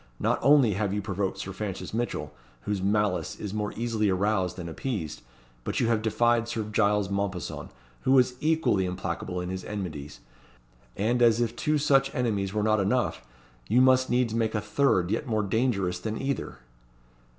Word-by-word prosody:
Not - - +1
only 135 -5 +5
have 100 0 -1
you - - 0
provoked 100 -1 -2
Sir 95 0 -5
Francis 95 -1 -5
Mitchell, 120 +2 -3 0.3
whose 100 +3 -2
malice 105 -1 0
is 105 -2 -5
more 105 -1 -2
easily 115 -3 0
aroused 95 -1 +1
than 90 -3 -6
appeased, 85 - -4 0.4
but - - -2
you 115 - +2
have 115 -2 +2
defied 115 +1 +2
Sir 115 -2 -2
Giles 105 -2 +1
Mompesson, 100 -3 -3 0.3
who 135 +1 +4
is 125 0 +4
equally 155 - +2
implacable 90 0 -4
in 90 0 -4
his 95 0 -4
enmities; 80 -9 -6 0.8
and 120 +5 +1
as 115 -1 +5
if 120 -1 0
two 150 +5 +1
such 135 -2 +2
enemies 105 -6 0
were 105 0 -1
not 110 0 +3
enough, 110 - 0 0.5
you 120 +4 +4
must 130 0 +4
needs 120 -2 +1
make 115 -1 0
a - - +2
third, 105 -4 +1
yet 150 - -1
more 110 -2 0
dangerous 100 -5 0
than 110 +3 -4
either." 135 0 -3
105 Hz, 175 wpm, -27 LUFS, 95-120 Hz, 0.8 s, only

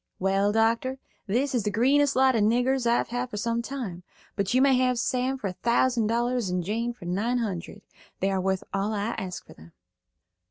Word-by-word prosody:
"Well, 195 +2 +1
doctor, 230 +4 +1 0.3
this 255 +7 0
is 245 - +1
the 210 - -1
greenest 275 +7 +3
lot 260 0 +4
of 220 - +2
niggers 245 +4 +2
I've 235 - +2
had 245 +1 -3
for 210 - -6
some 230 +2 -1
time, 235 -9 -5 0.3
but 200 -1 -1
you 255 - +3
may 270 0 +5
have 255 -1 +2
Sam 255 +3 0
for 245 - -8
a 190 - -2
thousand 235 +2 +1
dollars 240 -1 0
and 180 -1 -1
Jane 230 +6 -2
for 235 -7 -12
nine 205 +8 0
hundred. 200 -3 -4 0.4
They 195 +1 +1
are 190 -1 0
worth 190 0 -1
all 195 +2 -1
I 205 +1 -1
ask 185 -3 -6
for - - -14
them." 80 +2 -17
230 Hz, 205 wpm, -26 LUFS, 195-250 Hz, 0.4 s, may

